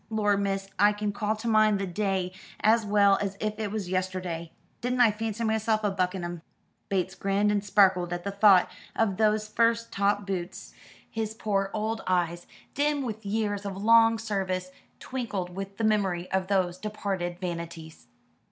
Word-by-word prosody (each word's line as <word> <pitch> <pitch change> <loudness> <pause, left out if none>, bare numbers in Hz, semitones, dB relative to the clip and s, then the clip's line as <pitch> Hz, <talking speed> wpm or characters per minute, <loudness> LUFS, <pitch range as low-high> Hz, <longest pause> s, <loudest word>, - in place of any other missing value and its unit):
Lor, 210 -2 +2
miss, 195 -1 -1
I 205 +1 +5
can 205 0 -2
call 210 +1 -1
to 220 +2 -6
mind 215 -2 +4
the 195 - -2
day 190 -1 -1 0.3
as 220 0 +3
well 200 -1 +4
as 200 -1 -3
if 215 0 -3
it 215 -2 -2
was 210 -3 -3
yesterday. 185 -3 -3 0.3
Didn't 250 +1 -1
I 235 -3 +6
fancy 220 +1 -3
myself 220 0 +1
a 205 - +1
buck 185 -1 0
in 185 - -4
'em." 175 -1 -5 0.5
Bates 190 -1 0
grinned 200 +2 +1
and 205 -1 0
sparkled 190 -3 +3
at 175 0 -3
the 200 - -3
thought 200 -2 +6 0.3
of 205 -4 +1
those 215 -1 +2
first 230 +1 +1
top 200 +1 +1
boots. 185 -2 -5 0.3
His 220 -1 -4
poor 195 -3 -1
old 220 +1 -2
eyes, 175 -1 0 0.3
dim 290 0 +1
with 220 -4 -5
years 205 -1 -1
of 195 -2 -5
long 225 +2 +5
service, 190 -4 -2 0.3
twinkled 205 -9 -4
with 195 +1 -6
the 225 - -3
memory 195 -5 +1
of 190 -1 0
those 185 -2 0
departed 195 -4 -3
vanities. 170 -3 -6
200 Hz, 175 wpm, -27 LUFS, 185-215 Hz, 0.5 s, I